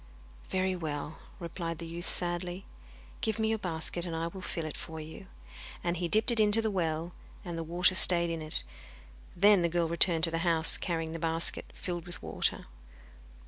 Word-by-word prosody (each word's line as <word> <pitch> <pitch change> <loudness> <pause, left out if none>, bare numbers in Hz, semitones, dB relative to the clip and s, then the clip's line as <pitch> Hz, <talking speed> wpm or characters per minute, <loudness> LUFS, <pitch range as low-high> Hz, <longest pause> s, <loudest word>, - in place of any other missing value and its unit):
'Very 185 0 0
well,' 155 -2 -4 0.2
replied 170 -1 -4
the 170 - -7
youth 170 +2 -5
sadly. 175 +1 -1 0.6
'Give 220 -1 0
me 220 0 +1
your 220 0 0
basket 170 -1 -2
and 170 -2 -4
I 165 +1 -1
will 185 +3 -6
fill 165 -3 -3
it 155 - -5
for 160 0 -7
you.' 155 +1 -9 0.6
And 175 0 0
he 175 0 -1
dipped 215 +6 +4
it 235 - +2
into 210 +1 +4
the 220 -1 0
well, 165 -2 -1 0.3
and 175 -2 -4
the 165 - -3
water 175 +3 +2
stayed 170 -2 +4
in 165 -1 -3
it. 155 - 0 0.7
Then 200 +1 +6
the 170 - +2
girl 170 0 +1
returned 170 0 +3
to 165 - +6
the 165 - -1
house, 165 -2 +5
carrying 165 -3 -2
the 165 - -5
basket 165 0 0
filled 175 -1 -5
with 175 - -5
water. - - -1
170 Hz, 190 wpm, -30 LUFS, 165-185 Hz, 0.7 s, Then